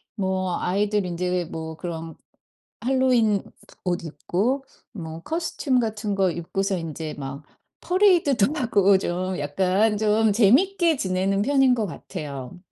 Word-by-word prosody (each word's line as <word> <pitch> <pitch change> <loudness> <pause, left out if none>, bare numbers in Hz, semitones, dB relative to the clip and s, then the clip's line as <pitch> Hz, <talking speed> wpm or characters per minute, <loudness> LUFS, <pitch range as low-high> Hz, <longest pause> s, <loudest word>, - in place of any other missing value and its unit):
뭐 190 -3 -1
아이들 205 +1 0
인제 180 -1 -2
뭐 160 0 -6
그런 165 -2 -6 0.7
할로윈 245 -5 +2 0.4
옷 175 -1 -1
입고 225 - -1 0.3
뭐 160 -3 -7
코스튬 315 -5 -1
같은 215 -2 -2
거 190 -2 +3
입고서 190 +3 -2
이제 160 -1 -5
막 140 +1 -6 0.4
퍼레이드도 355 - +3
하고 200 -7 +4
좀 185 0 -2
약간 190 +8 +1
좀 215 0 +3
재미있게 320 - +4
지내는 195 -1 0
편인 270 0 +4
것 225 -3 -1
같아요. 145 -3 -7
195 Hz, 245 characters per minute, -24 LUFS, 175-235 Hz, 0.7 s, 하고